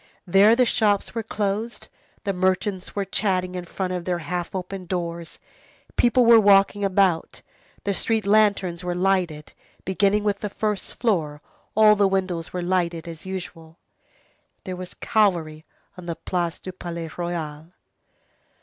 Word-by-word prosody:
There 195 +5 +6
the 250 +1 +4
shops 215 -4 +1
were 230 - -2
closed, 215 +1 -3 0.4
the 200 -2 -1
merchants 185 +1 -1
were 200 -1 -1
chatting 185 -3 -1
in 180 -1 -5
front 185 +1 -3
of 180 -1 -3
their 180 0 -1
half 175 +3 -4
open 185 0 -5
doors, 170 -2 -4 0.6
people 240 +1 +4
were 230 -1 +8
walking 200 0 +4
about, 190 -3 +1 0.4
the 200 - 0
street 220 +2 0
lanterns 200 -4 +2
were 175 0 -2
lighted, 180 -5 0 0.3
beginning 200 +2 +2
with 205 -1 0
the 210 - -3
first 210 0 -3
floor, 165 -11 0 0.4
all 215 0 +7
the 200 -1 +3
windows 185 -4 -2
were 180 -1 -3
lighted 175 -2 -1
as 165 +2 -9
usual. 170 -3 -7 0.9
There 185 - -5
was 180 0 -8
cavalry 170 -8 0 0.3
on 180 -2 -10
the 170 - -2
Place 175 -1 -2
du 185 - -8
Palais 170 -3 -6
Royal. 160 -3 -4
185 Hz, 150 wpm, -24 LUFS, 175-205 Hz, 0.9 s, were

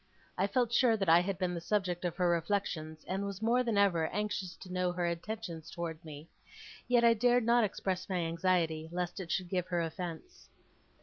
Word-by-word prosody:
I 190 +2 +1
felt 240 +1 +1
sure 240 -3 +4
that 195 -4 0
I 165 +1 +8
had 185 +1 -2
been 185 -2 -1
the 170 - -4
subject 180 -2 -1
of 175 - -1
her 180 -2 +1
reflections, 165 -3 -1
and 190 +2 -2
was 200 -1 -4
more 235 +3 +2
than 230 -4 0
ever 175 -6 +3
anxious 205 -2 -3
to 180 -1 -10
know 180 -1 +1
her 175 0 -1
intentions 170 -1 -4
towards 170 -1 -5
me. 155 0 -10 0.6
Yet 245 -1 +4
I 235 0 +7
dared 245 +2 +3
not 235 0 +4
express 190 -2 -2
my 185 - 0
anxiety, 165 -1 0
lest 180 +2 -3
it 175 -3 -5
should 180 -2 -1
give 180 -1 -1
her 175 -1 0
offence. 170 - -6
180 Hz, 200 wpm, -32 LUFS, 170-210 Hz, 0.6 s, I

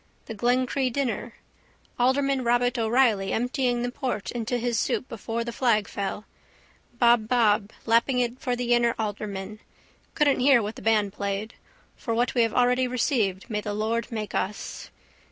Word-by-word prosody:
The 225 - -6
Glencree 250 +3 +1
dinner. 240 -3 -2 0.6
Alderman 265 +1 +2
Robert 245 +1 +1
O'Reilly 225 -4 +2
emptying 245 0 0
the 245 - -2
port 250 -6 -3
into 240 +1 -2
his 240 -1 -1
soup 255 - -1
before 230 +1 -4
the 235 - -5
flag 225 -5 +2
fell. 200 +1 -4 0.7
Bobbob 225 -3 +3 0.2
lapping 235 +3 +3
it 245 0 -1
for 250 -1 -1
the 245 0 0
inner 235 -1 +2
alderman. 205 -1 -4 0.6
Couldn't 290 -3 +3
hear 265 0 +5
what 215 0 -4
the - - -10
band 210 -3 +2
played. 200 +3 -3 0.4
For 230 - -3
what 240 +2 +1
we 245 - +3
have 230 -1 +1
already 250 +1 +3
received 230 -7 0
may 210 -3 -2
the 205 0 -4
Lord 225 +3 -1
make 215 -2 -4
us. 200 +3 -4
235 Hz, 155 wpm, -26 LUFS, 215-250 Hz, 0.7 s, hear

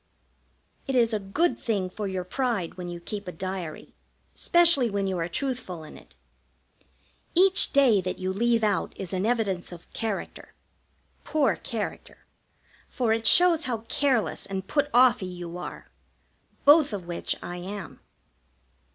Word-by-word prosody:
It 270 - -1
is 235 -2 +3
a 215 - +1
good 245 - 0
thing 200 -5 -1
for 200 +3 -5
your 190 -1 -3
pride 215 -3 -2
when 180 -1 -7
you 175 0 -6
keep 200 +3 -6
a - - -3
diary, 185 -2 -6 0.4
specially 340 -8 +4
when 200 -1 -1
you 190 -2 -1
are 165 - -1
truthful 190 - -4
in 155 - -11
it. - - -17 1.2
Each 380 +2 +5
day 255 -8 +4
that 185 0 -4
you 185 0 -2
leave 230 +2 +2
out 205 -2 0
is 190 -2 -6
an 190 +3 0
evidence 205 -8 -1
of 175 -1 -13
character 220 -4 -5 0.7
poor 305 -3 +1
character 225 -4 -6 0.6
for 235 -3 +1
it 225 0 0
shows 340 0 +5
how 235 -4 -2
careless 260 -4 0
and 190 -1 -4
put 290 -1 +1
off 245 -1 +5
y 185 - -3
you 175 -1 -7
are; - - -8 0.7
both 295 -3 +6
of 190 -4 -5
which 170 0 -3
I 175 - -5
am. 190 +1 -7
210 Hz, 155 wpm, -26 LUFS, 185-255 Hz, 1.2 s, both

